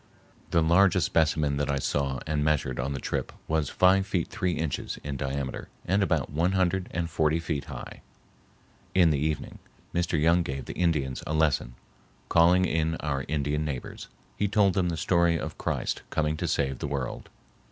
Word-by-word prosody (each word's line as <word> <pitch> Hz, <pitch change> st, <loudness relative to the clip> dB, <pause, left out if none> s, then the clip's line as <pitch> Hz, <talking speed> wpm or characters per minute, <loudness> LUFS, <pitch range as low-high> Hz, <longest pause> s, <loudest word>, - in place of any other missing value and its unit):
The 85 Hz, -, +3 dB
largest 85 Hz, +3 st, +4 dB
specimen 75 Hz, -3 st, +2 dB
that 75 Hz, 0 st, -1 dB
I 70 Hz, -, +1 dB
saw 70 Hz, -1 st, -1 dB
and 75 Hz, -1 st, 0 dB
measured 75 Hz, -5 st, 0 dB
on 65 Hz, +3 st, -1 dB
the 70 Hz, -, -4 dB
trip -, -, -3 dB, 0.2 s
was 80 Hz, -3 st, 0 dB
five 95 Hz, +1 st, +4 dB
feet 90 Hz, -4 st, -1 dB
three 95 Hz, -3 st, -1 dB
inches 80 Hz, -3 st, -3 dB
in 70 Hz, -1 st, -4 dB
diameter 70 Hz, 0 st, -4 dB, 0.2 s
and 95 Hz, +3 st, +2 dB
about 80 Hz, -8 st, 0 dB
one 85 Hz, +5 st, +1 dB
hundred 95 Hz, 0 st, +1 dB
and 85 Hz, -1 st, -2 dB
forty 80 Hz, 0 st, +1 dB
feet 80 Hz, -3 st, -3 dB
high. -, -, -8 dB, 0.9 s
In 85 Hz, -3 st, +6 dB
the 70 Hz, -, +1 dB
evening 75 Hz, 0 st, -2 dB, 0.3 s
Mr. 85 Hz, -2 st, 0 dB
Young 85 Hz, +3 st, +4 dB
gave 70 Hz, -5 st, -4 dB
the -, -, -6 dB
Indians 75 Hz, -7 st, 0 dB
a 75 Hz, -, -1 dB
lesson, 75 Hz, -6 st, +1 dB, 0.5 s
calling 90 Hz, +2 st, +5 dB
in 80 Hz, -1 st, 0 dB
our 70 Hz, -4 st, -2 dB
Indian 75 Hz, 0 st, -1 dB
neighbors. 70 Hz, -5 st, -5 dB, 0.3 s
He 105 Hz, -, +1 dB
told 100 Hz, -2 st, +3 dB
them 90 Hz, -1 st, +1 dB
the 85 Hz, -, -2 dB
story 85 Hz, +1 st, +2 dB
of -, -, -6 dB
Christ -, -, -2 dB
coming 75 Hz, 0 st, 0 dB
to -, -, -2 dB
save 65 Hz, -2 st, 0 dB
the -, -, -3 dB
world. 70 Hz, -2 st, -4 dB
80 Hz, 180 wpm, -27 LUFS, 70-85 Hz, 0.9 s, In